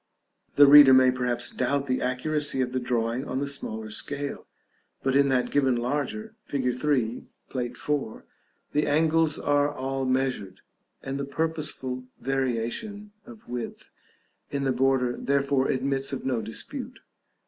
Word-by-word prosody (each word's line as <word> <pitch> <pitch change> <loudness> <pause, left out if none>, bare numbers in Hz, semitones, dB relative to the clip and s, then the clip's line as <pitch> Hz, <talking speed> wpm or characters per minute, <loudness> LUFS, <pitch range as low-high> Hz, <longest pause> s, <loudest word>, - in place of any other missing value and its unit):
The 145 - +8
reader 140 -2 +9
may 130 0 +6
perhaps 125 -1 -1
doubt 140 -1 0
the 130 -2 -1
accuracy 140 +2 0
of 125 -1 0
the 130 - -1
drawing 120 0 -1
on 130 - -3
the 140 - -1
smaller 110 -6 -4
scale, 145 +5 -4 0.6
but 135 0 +1
in 140 0 +5
that 130 -2 +1
given 135 -3 +3
larger, 150 - -2
fig. 130 -3 -1
3, 125 -3 -1 0.2
Plate 125 -2 -3
IV., 145 -7 -3 0.5
the 150 +1 +1
angles 160 +1 +2
are 145 0 +2
all 135 -1 -3
measured, 130 -7 -1 0.4
and 135 +1 -4
the 140 - -2
purposeful 140 -4 -3
variation 135 - -2 0.2
of 230 -3 -13
width 120 -1 -6 0.6
in 140 -1 -2
the 135 - +1
border 125 -1 +1
therefore 140 -1 +1
admits 135 +1 0
of 135 - -5
no 125 -4 0
dispute. 110 +1 -4
135 Hz, 145 wpm, -26 LUFS, 125-145 Hz, 0.6 s, reader